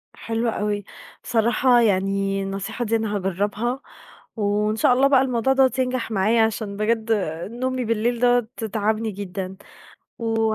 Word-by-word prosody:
حلو 230 Hz, +1 st, -2 dB
أوي، 210 Hz, -2 st, -2 dB, 0.4 s
صراحة 240 Hz, +2 st, +3 dB
يعني 195 Hz, -1 st, +1 dB
النصيحة 195 Hz, +5 st, -4 dB
دي 225 Hz, +1 st, +1 dB
أنا 220 Hz, -2 st, -1 dB
هاجربها 205 Hz, +6 st, -1 dB, 0.5 s
وإن 210 Hz, 0 st, 0 dB
شاء 225 Hz, -, +4 dB
الله 265 Hz, +2 st, +4 dB
بقى 270 Hz, -2 st, +5 dB
الموضوع 255 Hz, 0 st, +1 dB
دوّة 265 Hz, -1 st, +4 dB
ينجح 255 Hz, -3 st, -1 dB
معايا 215 Hz, +3 st, +3 dB
عشان 215 Hz, -2 st, -2 dB
بجد 220 Hz, +1 st, 0 dB, 0.4 s
نومي 255 Hz, +1 st, -2 dB
بالليل 230 Hz, +2 st, 0 dB
دوّة 245 Hz, -1 st, +3 dB, 0.3 s
تعبني 220 Hz, +1 st, 0 dB
جدًا 190 Hz, -1 st, -6 dB, 0.6 s
و 225 Hz, -2 st, 0 dB
220 Hz, 135 wpm, -23 LUFS, 205-240 Hz, 0.6 s, بقى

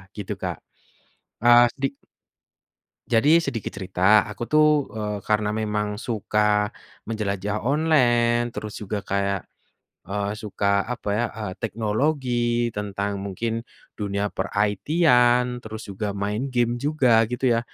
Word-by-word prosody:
gitu 105 Hz, -3 st, -4 dB
Kak, -, -, -2 dB, 0.9 s
ah, 120 Hz, 0 st, +7 dB
sedi 135 Hz, 0 st, 0 dB, 1.2 s
Jadi 145 Hz, +8 st, +5 dB
sedikit 120 Hz, -9 st, -2 dB
cerita, 95 Hz, +2 st, +3 dB
aku 105 Hz, +2 st, -6 dB
tuh, 150 Hz, -2 st, +4 dB
eee, 105 Hz, -1 st, -4 dB
karena 105 Hz, 0 st, +1 dB
memang 105 Hz, -1 st, -1 dB
suka, 105 Hz, -2 st, 0 dB, 0.3 s
menjelajah 105 Hz, -1 st, -2 dB
online 120 Hz, -4 st, +2 dB
terus 105 Hz, -2 st, -7 dB
juga 100 Hz, 0 st, -4 dB
kayak, 100 Hz, -1 st, -1 dB, 0.6 s
eee, 100 Hz, +2 st, -2 dB
suka 100 Hz, -2 st, 0 dB
apa 120 Hz, -3 st, -5 dB
ya, 120 Hz, -, +1 dB
eee, 105 Hz, -4 st, -5 dB
teknologi 120 Hz, +1 st, 0 dB
tentang 100 Hz, 0 st, -3 dB
mungkin, 115 Hz, +4 st, -3 dB, 0.3 s
dunia 100 Hz, -1 st, -2 dB
per-IT-an, 125 Hz, -, +2 dB
terus 110 Hz, -1 st, -8 dB
juga 100 Hz, +1 st, -3 dB
main 105 Hz, +7 st, -3 dB
game 120 Hz, -1 st, +1 dB
juga 130 Hz, -5 st, +3 dB
gitu 125 Hz, +3 st, -1 dB
ya, 115 Hz, -1 st, +3 dB
110 Hz, 120 wpm, -24 LUFS, 105-120 Hz, 1.2 s, ah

